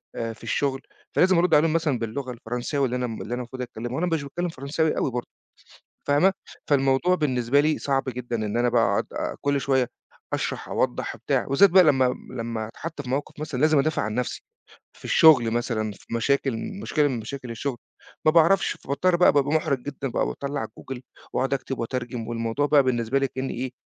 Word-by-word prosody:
آآ 115 -1 -3
في - - -18
الشغل، 135 -2 -1 0.3
فلازم 185 -1 +4
أرُد 175 -2 +4
عليهم 155 +1 +4
مثلًا 150 -7 +1
باللغة 125 +3 -4
الفرنسية 120 +4 -4
واللي 125 -2 +1
أنا 125 0 -1
م 115 - -6
اللي 120 - -5
أنا - - +1
المفروض 125 +1 -7
أتكلّمها 120 0 -5
وأنا 180 +4 0
مش 165 -4 0
باتكلّم 175 +5 -3
فرنساوي 155 +2 -1
أوي 130 - 0
برضه 120 0 -4 0.8
فاهمة، 145 +7 +4 0.4
فالموضوع 135 +5 +3
بالنسبة 130 -4 +2
لي 155 +1 +1
صعب 135 -1 0
جدًا 120 -1 -3
إن 110 0 -2
أنا 120 0 +2
بقى 120 -1 +3
أقعُد - - -1
كلّ 140 0 +1
شوية 130 -2 +1 0.4
أشرَح، - - -2
أوضَّح - - -1
وبتاع، - - -1
وبالذات 165 +8 +5
بقى 185 0 +7
لما 130 -4 +3 0.2
لما 115 -3 -4
أتحَط 155 +4 -7
في 125 - -9
موقِف 145 +2 -3
مثلًا 145 -4 -4
لازم 155 0 +4
أدافع 155 +3 +1
عن 105 0 -3
نَفسي، 125 0 -3 0.5
في - - -20
الشغل 130 -8 +6
مثلًا، 110 -2 -1
في 110 - -10
مشاكل 135 +1 +1 0.3
مشكلة 150 -7 +2
من 125 -3 -2
مشاكل 125 +2 -7
الشغل، 120 +2 -3 0.5
ما - - +8
باعرَفش، 170 +4 +4
فباضطر 175 +6 0
بقى 180 - +5
بابقى 145 +1 +2
مُحرَج 140 -3 0
جدًا 135 -1 -4
بقى، - - 0
باطلّع 140 -4 -3
Google 125 +3 -9 0.3
وأقعُد 135 +1 +1
أكتِب 135 0 -4
وأترجِم 120 -1 -4
والموضوع 115 +4 -1
بقى 145 -1 +5
بالنسبة 125 0 +1
لي 135 - +1
كأنّي 130 0 -4
إيه، 125 +1 -4
135 Hz, 195 wpm, -25 LUFS, 120-145 Hz, 0.8 s, ما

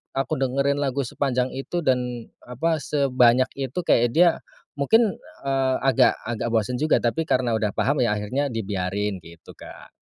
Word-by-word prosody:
aku 135 -1 -1
dengerin 140 +2 0
lagu 140 -1 -1
sepanjang 130 0 -1
itu 170 +6 -4
dan 125 -3 -1 0.2
apa, 155 +7 -1
sebanyak 130 -4 +2
itu 135 -2 -4
kayak 120 -7 +3
dia 175 +1 +6 0.5
mungkin, 220 +9 +3 0.3
eee, 135 -1 +1
agak-agak 125 -3 +1
bosen 120 +3 0
juga, 155 -2 +2
tapi 160 +7 -1
karena 125 -2 +1
udah 110 -3 -1
paham 140 +1 +1
ya 120 -4 +2
akhirnya 125 +8 -2
dibiarin 100 -3 -3
gitu, 85 0 -15
Kak. - - -12
130 Hz, 150 wpm, -23 LUFS, 115-140 Hz, 0.5 s, dia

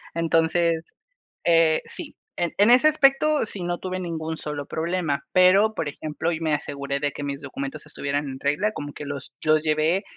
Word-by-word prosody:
Entonces, 165 0 +2 0.6
eh, 165 -2 +4
sí. - - -5 0.2
En 175 -1 -1
en 205 +3 +5
ese 250 +5 +7
aspecto, 300 -1 +3
sí, 200 -3 -4
no 175 0 -2
tuve 185 0 -4
ningún 160 -2 -4
solo 150 -2 -5
problema. 165 -2 -2
Pero, 190 +4 +5
por 160 - -2
ejemplo, 155 +3 -3
y 160 - -4
me 160 -2 0
aseguré 140 -1 -3
de 145 0 -1
que - - -7
mis 140 -1 -4
documentos 275 - -6
estuvieran 145 +1 -3
en 135 0 -7
regla, 150 +10 0
como 145 -7 -6
que 150 - -8
los 140 -2 -7
los 155 0 +3
llevé, 155 +4 +1
160 Hz, 185 wpm, -24 LUFS, 145-185 Hz, 0.6 s, ese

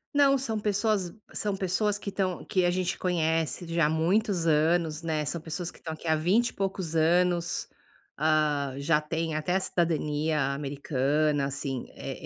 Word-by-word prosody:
Não, 275 -1 +5
são 225 -5 -2
pessoas 205 -3 0 0.2
são 205 -2 -1
pessoas 200 +2 0
que 200 0 -5
estão 190 -2 -2
que 185 -2 +1
a - - +4
gente 185 +1 -1
conhece 165 -1 0
já 165 -1 +2
há - - 0
muitos 175 +3 +1
anos, 160 0 +2
né. 155 -2 -1
São 165 +3 -3
pessoas 165 +2 -4
que - - -18
estão 160 - -6
aqui 160 +1 -9
há 160 - +4
vinte 190 +10 +2
e - - -14
poucos 190 -4 -3
anos, 175 +1 +2 0.5
ah, 150 -3 +1
já 150 +2 +2
têm 160 +1 -2
até 155 +4 0
a - - +3
cidadania 155 -5 0
americana, 145 +1 0
assim. 135 -2 -4
Eh, - - -6
165 Hz, 170 wpm, -28 LUFS, 155-185 Hz, 0.5 s, Não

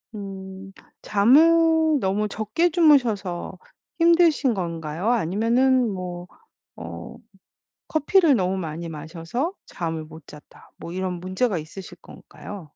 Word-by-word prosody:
음. 195 -1 -8 0.3
잠을 315 +7 +4
너무 205 +2 0
적게 220 - 0
주무셔서 230 - +2 0.4
힘드신 330 -6 +4
건가요? 170 +1 -3
아니면은 240 +5 +2
뭐 180 -1 -6 0.5
어 85 0 -9 0.7
커피를 315 0 +3
너무 185 -4 0
많이 165 -1 -5
마셔서 165 - -4
잠을 165 -3 -5
못 160 -1 -14
잤다. 150 0 -16
뭐 170 - -8
이런 185 -1 -3
문제가 185 +3 -1
있으실 160 +5 -9
건가요? 205 -2 -11
195 Hz, 235 characters per minute, -23 LUFS, 175-265 Hz, 0.7 s, 잠을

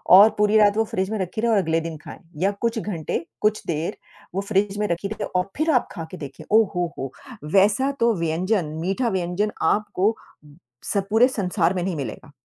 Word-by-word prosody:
और 205 +3 +9
पूरी 210 +1 +4
रात 205 -1 +5
वो 225 - +4
फ्रिज 190 -2 -2
में 220 - -1
रखी 190 +3 -3
रहे 235 0 +2
और 220 - +4
अगले 165 -4 +1
दिन 165 -1 -5
खाएँ 150 - -11 0.2
या 195 +2 +3
कुछ 230 -1 0
घंटे, 170 -5 -3 0.2
कुछ 215 0 +1
देर, 160 0 -2 0.4
वो 195 - 0
फ्रिज 200 0 0
में 210 - +1
रखी 175 +2 -2
रहिए 215 - -4
और 180 +1 +1
फिर 315 +2 +2
आप 250 -5 +2
खा 165 - -6
के 185 - -7
देखिए 140 -5 -9
ओहोहो! 175 - 0 0.4
वैसा 210 +8 +4
तो 235 0 +4
व्यंजन, 170 +4 0 0.2
मीठा 195 +8 0
व्यंजन 190 +2 -1
आपको 210 0 +1 0.7
स - - -1
पूरे 225 +4 +5
संसार 180 -6 0
में 180 -2 -2
नहीं 185 -1 -2
मिलेगा। 135 0 -6
195 Hz, 200 wpm, -23 LUFS, 175-215 Hz, 0.7 s, और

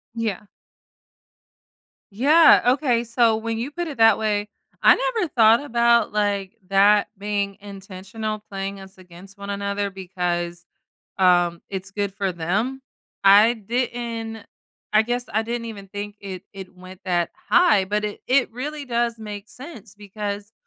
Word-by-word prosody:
Yeah. 215 -3 -3 1.6
Yeah, 295 +9 +6
okay. 250 -5 0
So 230 -1 +2
when 225 0 -3
you 245 +5 -4
put 345 +2 -4
it 285 -5 -7
that 225 -2 +6
way, 210 -1 -1 0.3
I - - +7
never 465 -6 -1
thought 230 0 +5
about, 235 -4 +2
like, 205 -1 -1
that 200 +1 +4
being 200 -1 -2
intentional 200 +2 -7
playing 195 0 -5
us 190 0 -13
against 185 +2 -15
one 200 0 -8
another 200 0 -2
because, 175 -2 -4 0.6
um, 175 -2 +3
it's 195 0 -6
good 200 -1 -3
for 195 -2 -2
them. 210 +11 -2 0.4
I 210 +4 +7
didn't 230 -1 -4 0.5
I 215 - +5
guess 245 +2 -3
I 220 +2 +1
didn't 230 +1 -4
even 200 -3 -8
think 205 +1 -7
it 190 -2 -8
it 190 -1 -10
went 185 +1 -13
that 175 -2 0 0.2
high 355 - +5
but 210 +2 -2
it 210 - -5
it 260 0 +3
really 290 +5 -5
does 235 -1 -1
make 210 -1 -8
sense 250 - -11
because, 205 0 -6
210 Hz, 145 wpm, -22 LUFS, 195-235 Hz, 1.6 s, I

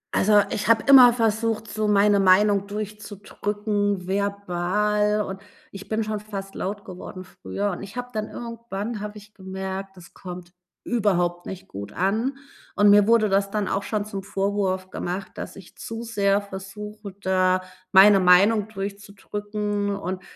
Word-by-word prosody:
Also, 205 +1 +5
ich 210 - -2
habe 225 -1 +5
immer 260 -3 +9
versucht, 225 -1 0
so 215 -1 -2
meine 205 0 +4
Meinung 200 +1 +4
durchzudrücken, 205 -1 -3
verbal, 200 +2 0
und 190 0 -7 0.3
ich 195 0 -10
bin 220 0 0
schon 215 0 -3
fast 195 -2 -7
laut 200 +2 -4
geworden 185 0 -9
früher. 200 +2 -4
Und 180 - -6
ich 200 +5 -9
habe 245 0 -4
dann 215 -1 -3
irgendwann 230 -2 -6
habe 210 +1 -6
ich 210 +1 -15
gemerkt, 190 0 -6
das 175 +1 -15
kommt 180 -1 -9 0.3
überhaupt 175 -6 0
nicht 190 -1 -8
gut 100 +1 -8
an 220 +9 0 0.4
und 205 0 +5
mir 205 0 +6
wurde 230 -2 +4
das 200 0 +1
dann 210 -2 -1
auch 195 - 0
schon 210 -2 -2
zum 200 -2 -5
Vorwurf 195 -1 -1
gemacht, 185 +2 -4
dass - - -7
ich 190 -3 -14
zu 225 +1 -6
sehr 205 -3 +1
versuche, 200 +1 -9
da 185 -1 +2 0.3
meine 195 +1 +8
Meinung 195 +4 +5
durchzudrücken 205 0 -4
und 185 -1 -4
200 Hz, 155 wpm, -24 LUFS, 190-210 Hz, 0.4 s, immer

